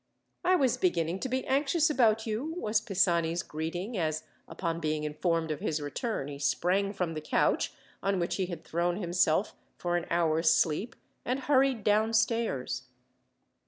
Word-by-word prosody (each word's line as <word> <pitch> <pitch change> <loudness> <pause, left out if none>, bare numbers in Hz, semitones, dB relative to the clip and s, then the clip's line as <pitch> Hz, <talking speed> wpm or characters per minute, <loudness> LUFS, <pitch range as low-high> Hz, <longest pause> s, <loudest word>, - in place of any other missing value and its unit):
"I 370 +1 +4
was 265 -8 +2
beginning 175 0 0
to 260 - -3
be 260 +1 -1
anxious 290 +4 +2
about 225 -5 +3
you," 240 +9 -3
was 215 -8 +1
Pisani's 175 -5 +1
greeting, 175 +8 -4
as, 155 -1 -1 0.2
upon 165 -2 -3
being 155 -1 -1
informed 160 +2 -1
of 150 - -3
his 155 -1 -1
return, 145 - -3
he 140 -1 -7
sprang 180 +8 +1
from 180 -5 -2
the 155 - -4
couch, 150 - +1 0.3
on 195 0 +1
which 170 - -1
he 190 -2 0
had 170 -3 -7
thrown 175 +1 0
himself 180 0 +1 0.2
for 175 0 0
an 175 - -4
hour's 165 -1 +2
sleep, 170 +9 +1 0.3
and 255 +3 -1
hurried 265 -4 +2
downstairs. 215 - +1
180 Hz, 160 wpm, -29 LUFS, 160-225 Hz, 0.3 s, I